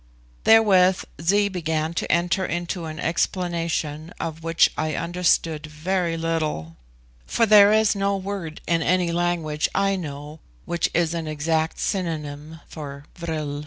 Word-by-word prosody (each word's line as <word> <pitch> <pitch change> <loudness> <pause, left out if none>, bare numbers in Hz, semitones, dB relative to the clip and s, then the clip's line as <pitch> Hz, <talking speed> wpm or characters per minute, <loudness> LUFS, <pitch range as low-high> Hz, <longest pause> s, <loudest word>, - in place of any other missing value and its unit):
Therewith 190 -5 +5 0.2
Zee 200 +5 +3
began 160 -4 -2
to - - -2
enter 175 +3 +1
into 175 0 -3
an 155 -1 -7
explanation 165 -2 -1
of 160 -1 -4
which 165 0 +3
I 155 -1 -2
understood 170 -3 0
very 165 +2 -1
little, 155 - -2 0.5
for 230 - +2
there 210 -1 +7
is 220 0 +4
no 200 0 0
word 190 -5 -5
in 165 -1 +1
any 180 0 +1
language 170 -3 0
I 195 0 +2
know 150 -3 -7 0.3
which 170 - 0
is 165 -1 +2
an 165 -2 -3
exact 160 +1 -1
synonym 160 -4 -4
for 140 -2 -8
vril. 155 -4 -4
165 Hz, 135 wpm, -23 LUFS, 155-185 Hz, 0.5 s, there